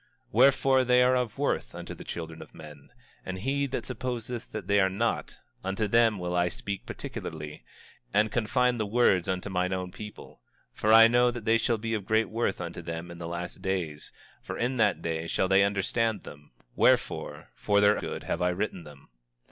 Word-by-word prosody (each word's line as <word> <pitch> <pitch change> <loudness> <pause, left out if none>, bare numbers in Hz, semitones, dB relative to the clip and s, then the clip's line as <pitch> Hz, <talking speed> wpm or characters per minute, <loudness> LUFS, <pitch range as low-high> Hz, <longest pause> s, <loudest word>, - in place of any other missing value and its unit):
25:8 - - -36 0.2
Wherefore, 130 +2 +4
they 125 0 +4
are 125 +1 +4
of 125 -4 -1
worth - - -1
unto - - -7
the - - -10
children 80 -1 -7
of - - -13
men, 75 -3 -12 0.3
and 95 0 -5
he 140 +7 -1
that 135 - -4
supposeth 125 -1 -5
that - - -5
they 100 0 +3
are 95 -1 +4
not, 110 +5 -2 0.3
unto 95 +3 -1
them 115 0 +4
will 90 -1 -3
I 90 0 +2
speak 100 +2 -6
particularly, 75 -2 -7 0.5
and 105 +1 +2
confine 120 +2 +1
the 110 - -1
words 100 -5 +3
unto 95 +1 -2
mine 90 0 0
own 90 -1 -3
people; 105 - -11 0.3
for 105 - +1
I 115 0 +9
know 120 +1 +4
that 120 -2 -6
they 115 0 +4
shall 115 0 +1
be 115 +1 -3
of 105 -3 -3
great 110 +1 +2
worth 115 -3 -1
unto 85 -1 -6
them 85 +1 -6
in 85 - -10
the 85 - -5
last 85 +2 -6
days; 90 -6 -3 0.3
for - - -6
in 125 +2 -1
that 105 -4 +2
day 80 0 -2
shall 95 - 0
they 95 +1 +5
understand 100 +2 0
them; 75 -1 -12 0.2
wherefore, - - +1
for 100 0 +1
their 105 +1 +4
good - - -5
have - - -3
I 90 - +3
written 95 -1 -3
them. 75 -2 -14
100 Hz, 200 wpm, -28 LUFS, 90-115 Hz, 0.5 s, I